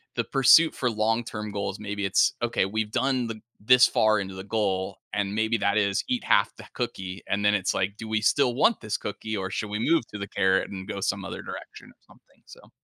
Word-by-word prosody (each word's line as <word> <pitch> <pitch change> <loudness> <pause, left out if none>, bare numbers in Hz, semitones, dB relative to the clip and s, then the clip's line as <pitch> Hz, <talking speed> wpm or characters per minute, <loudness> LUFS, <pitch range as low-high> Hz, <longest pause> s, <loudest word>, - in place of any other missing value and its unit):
the - - 0
pursuit 135 +5 +5
for 125 - 0
long 115 +2 0
term 105 -1 -6
goals. 100 0 -4
Maybe 105 -1 -4
it's, 95 -1 +3
"Okay, 120 -5 +1
we've 105 +2 -3
done 130 0 0
the 110 -1 -6 0.2
this 125 +3 +6
far 110 -1 +3
into 95 -1 -5
the 95 0 -7
goal." 100 -3 -1 0.2
And 100 -1 -1
maybe 110 +1 +1
that 110 - +1
is 100 -2 +1
eat 250 -2 -1
half 100 - +3
the - - -11
cookie, 95 0 -5
and 100 +1 -1
then 105 - +4
it's 95 -3 0
like, 95 +2 -1
"Do 110 - -7
we 110 0 +1
still 125 +4 +3
want 185 - +2
this 110 - -2
cookie, 110 +1 -5
or 95 -1 -3
should 105 +2 -4
we 105 +1 -3
move 160 +2 +2
to 105 - -8
the 100 - -5
carrot 95 -1 +1
and 95 -1 -7
go 105 -2 -4
some 95 +1 -1
other - - -6
direction - - -9
or - - -20
something," - - -24
so - - -16
105 Hz, 235 wpm, -26 LUFS, 100-115 Hz, 0.2 s, this